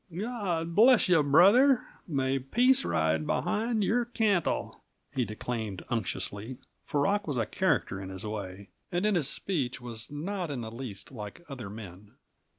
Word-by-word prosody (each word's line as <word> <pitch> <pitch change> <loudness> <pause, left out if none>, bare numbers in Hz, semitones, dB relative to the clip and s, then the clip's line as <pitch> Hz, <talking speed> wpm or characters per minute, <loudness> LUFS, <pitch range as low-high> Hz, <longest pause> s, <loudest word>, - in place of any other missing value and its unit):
"Gawd 180 -4 -2
bless 235 +5 +6
you, 180 -4 +5
brother! 200 - +6 0.2
May 135 -4 0
peace 245 - +3
ride 80 -1 +1
behind 215 - 0
your 240 +5 +2
cantle!" 215 -7 0 0.3
he 125 -2 0
declaimed 110 -3 -5
unctuously, 110 +1 -3 0.3
for 145 - 0
Rock 205 +7 +1
was 145 -4 -1
a 115 - +1
character, 95 -2 0
in 95 - -7
his 95 +2 -6
way, 100 -2 -6 0.2
and 175 +3 0
in 215 - +3
his 155 -7 +1
speech 140 -10 -2
was 120 -1 -7
not 175 +4 -4
in 135 -4 -3
the 110 -1 -6
least 115 -4 -7
like 110 +7 -8
other 125 -8 -7
men. 100 -1 -10
135 Hz, 155 wpm, -29 LUFS, -, 0.3 s, bless